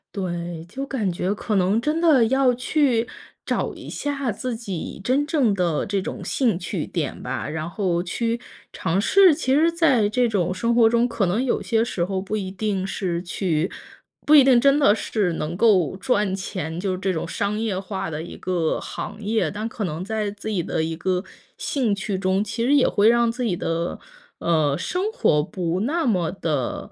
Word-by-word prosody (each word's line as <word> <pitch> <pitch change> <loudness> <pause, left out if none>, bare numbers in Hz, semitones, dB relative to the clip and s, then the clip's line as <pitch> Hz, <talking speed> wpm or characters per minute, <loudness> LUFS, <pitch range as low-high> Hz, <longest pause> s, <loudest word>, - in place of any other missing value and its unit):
对， 175 -3 -4
就 270 +8 -5
感 225 -9 -1
觉 180 +3 -1
可 210 +1 -3
能 195 +4 +2
真 305 +5 0
的 310 -8 +5
要 260 +1 +3
去 245 -2 +1 0.3
找 - - -1
一 - - -10
下 280 -4 -2
自 245 +4 -4
己 195 -5 -6
真 265 +6 +2
正 295 -8 +2
的 175 -5 0
这 200 -1 0
种 185 - -5
兴 235 -9 +1
趣 175 -3 -3
点 160 -6 -4
吧。 125 +2 -3
然 155 0 -4
后 175 -1 -1
去 230 +6 -2 0.3
尝 175 +4 -1
试， 380 - +6
其 265 -2 0
实 325 +3 +4
在 290 -11 +3
这 245 +4 +2
种 185 -4 0
生 230 +5 0
活 230 -2 +6
中 235 +1 +3
可 230 -4 0
能 195 +8 0
有 260 - 0
些 225 -1 +1
时 185 -7 -1
候 190 0 -2
不 210 +3 -3
一 190 -2 -4
定 195 -1 -2
是 180 -3 -2
去 175 -2 -1 0.5
不 305 - +5
一 285 - +9
定 255 -2 +5
真 275 +1 +5
的 275 -8 +5
是 205 -4 -1
能 160 +2 -4
够 190 -6 +3
赚 205 -1 +1
钱， 180 -4 -4
就 185 0 -1
这 190 +1 -1
种 165 -1 -3
商 200 +5 -2
业 220 -4 -1
化 190 -4 -4
的 150 - -4
一 170 - -9
个 175 -4 -1
行 - - -6
业。 220 +1 0
但 210 +3 -4
可 225 -1 -5
能 170 0 -3
在 215 0 -2
自 205 +1 -9
己 205 -5 0
的 160 - -2
一 160 0 -2
个 180 +2 -1 0.3
兴 250 -7 0
趣 195 -1 -3
中， 190 +1 +1
其 225 +2 -3
实 270 +4 +3
也 280 - +5
会 205 +2 +4
让 235 0 +3
自 250 +2 -4
己 210 -7 0
的， 170 +1 -2 0.4
呃， 155 -4 +1
生 365 - -2
活 155 - +2
不 175 +1 -2
那 315 +9 0
么 180 -9 +1
得 155 -9 -3
205 Hz, 215 characters per minute, -23 LUFS, 180-240 Hz, 0.5 s, 一